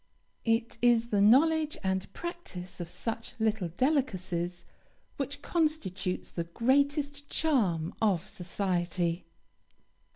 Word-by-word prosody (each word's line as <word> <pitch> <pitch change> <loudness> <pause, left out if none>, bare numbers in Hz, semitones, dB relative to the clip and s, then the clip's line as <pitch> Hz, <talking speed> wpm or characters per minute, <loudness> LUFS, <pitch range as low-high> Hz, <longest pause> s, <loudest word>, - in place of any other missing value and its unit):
It 230 0 +1
is 235 -1 +4
the 205 -3 +2
knowledge 305 +8 +5
and 190 0 -1
practice 335 - -7
of 170 -1 -5
such 225 +4 -4
"little 220 -4 +1
delicacies" 185 - -1 0.5
which 285 +1 -4
constitutes 300 - -1
the 170 - -3
greatest 280 - +1
charm 195 - +1
of 200 -4 +2
society. 175 -2 -1
220 Hz, 100 wpm, -30 LUFS, 180-280 Hz, 0.5 s, knowledge